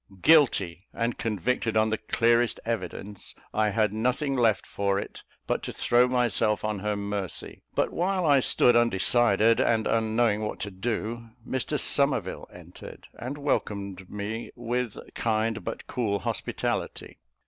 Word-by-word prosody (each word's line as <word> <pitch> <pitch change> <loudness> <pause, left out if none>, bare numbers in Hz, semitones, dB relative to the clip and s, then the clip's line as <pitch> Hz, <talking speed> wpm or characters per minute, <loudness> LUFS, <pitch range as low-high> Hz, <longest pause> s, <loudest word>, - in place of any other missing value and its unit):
Guilty, 105 - +4
and 115 0 -2
convicted 115 +2 -1
on 110 0 +3
the 110 - +1
clearest 115 0 +2
evidence, 100 -2 -5 0.2
I 110 0 +2
had 105 0 +1
nothing 125 +5 0
left 115 -5 +2
for 100 -1 -1
it, 100 - -6 0.2
but - - -1
to - - -5
throw 120 +1 +3
myself 120 -4 +1
on 105 -2 -2
her 105 +1 -1
mercy; 100 -2 -4
but - - 0
while 185 +1 0
I 145 -3 +5
stood 125 -1 +3
undecided, 115 0 +4
and 110 -1 +2
unknowing 110 -1 +1
what 105 - -4
to 100 - -4
do, 115 +3 -4 0.2
Mr 130 -2 -1
Somerville - - +1
entered, - - -12
and 130 +4 -6
welcomed 100 -9 -2
me 105 +3 -5
with 120 -1 -3 0.2
kind, 110 0 -1
but 115 - -5
cool 110 -5 -1
hospitality. - - -3
110 Hz, 140 wpm, -27 LUFS, 105-120 Hz, 0.2 s, I